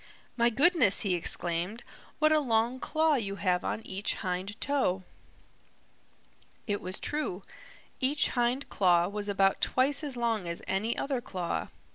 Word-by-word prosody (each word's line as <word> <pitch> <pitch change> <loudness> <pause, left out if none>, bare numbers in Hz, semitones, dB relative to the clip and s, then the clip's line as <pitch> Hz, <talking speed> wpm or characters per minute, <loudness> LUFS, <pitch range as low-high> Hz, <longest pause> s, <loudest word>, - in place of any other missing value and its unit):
"My 235 -1 +3
goodness," 280 - +4
he 200 -5 0
exclaimed, 175 +5 -1 0.3
"what 310 0 +3
a 310 - +5
long 235 -1 +1
claw 315 +2 +1
you 205 -8 -1
have 180 -3 0
on 220 - -3
each 195 +2 -2
hind 190 +4 -4
toe!" 260 -11 0 1.6
It 205 -2 -2
was 185 +2 -5
true. 295 -11 -3 0.6
Each 280 +2 +3
hind 245 +3 0
claw 175 -3 +3
was 205 0 -4
about 195 -1 +2
twice 275 +4 +2
as 275 -4 -4
long 225 -6 -1
as 170 0 -4
any 210 +5 -1
other 270 -3 -2
claw. 180 -6 -3
220 Hz, 145 wpm, -29 LUFS, 190-260 Hz, 1.6 s, a